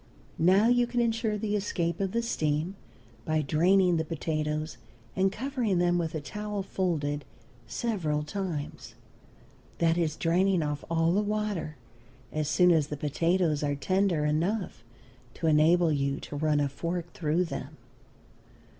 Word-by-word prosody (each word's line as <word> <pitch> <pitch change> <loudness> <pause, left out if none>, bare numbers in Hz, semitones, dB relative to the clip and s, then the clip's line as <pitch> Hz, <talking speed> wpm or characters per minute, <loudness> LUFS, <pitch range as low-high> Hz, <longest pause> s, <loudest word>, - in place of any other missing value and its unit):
Now 190 +6 +5
you 245 0 +3
can 240 0 -1
insure 225 -2 +1
the 210 0 -1
escape 170 -5 -1
of 195 -1 -1
the 235 +2 0
steam 155 -4 -1 0.5
by 155 +2 0
draining 180 +4 +3
the 160 - 0
potatoes 155 -2 -3 0.4
and 190 0 +2
covering 240 -4 -1
them 175 0 +2
with 165 -1 -2
a - - -1
towel 210 +4 -4
folded 150 -7 -1 0.4
several 165 -11 -1
times; 170 -3 -5 0.8
that 165 0 +2
is, 160 -2 0
draining 180 +1 +2
off 150 -1 -3
all 165 0 +2
the 205 - +3
water 210 -7 -2 0.6
as 155 -1 -1
soon 180 +2 +5
as 155 -4 +3
the 150 - -5
potatoes 160 +2 +1
are 145 -1 0
tender 185 0 +1
enough 165 - -1 0.5
to 170 - -4
enable 160 +2 +4
you 140 -1 0
to - - -7
run 150 0 +1
a 145 - +2
fork 170 +4 -4
through 165 +2 0
them. 165 - -6
170 Hz, 145 wpm, -28 LUFS, 150-195 Hz, 0.8 s, Now